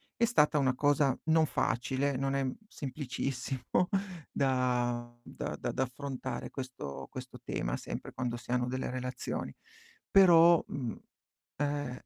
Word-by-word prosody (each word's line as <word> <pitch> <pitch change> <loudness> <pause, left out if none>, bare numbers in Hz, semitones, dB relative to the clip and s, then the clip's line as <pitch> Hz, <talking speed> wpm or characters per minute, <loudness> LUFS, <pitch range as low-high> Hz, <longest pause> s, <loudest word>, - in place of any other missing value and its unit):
È 235 - +3
stata 150 -7 +4
una 130 -2 +2
cosa 145 -1 +3
non 160 -1 +5
facile, 130 +2 0
non 135 +1 0
è, 135 - +1
mhmm, 130 - -1
semplicissimo 135 - -2 0.4
da 120 -3 0
da - - -5
da 130 - -1
affrontare 130 +1 -5
questo 70 - -6
questo - - -8
tema, - - -2
sempre - - -6
quando 120 -2 -2
si 120 - -9
hanno 125 0 +2
delle 130 0 -2
relazioni. 125 0 -3 0.6
Però, 170 -3 +8
mhmm, 125 -5 -4 0.6
eh 145 -3 -2
130 Hz, 130 wpm, -32 LUFS, 125-145 Hz, 0.6 s, Però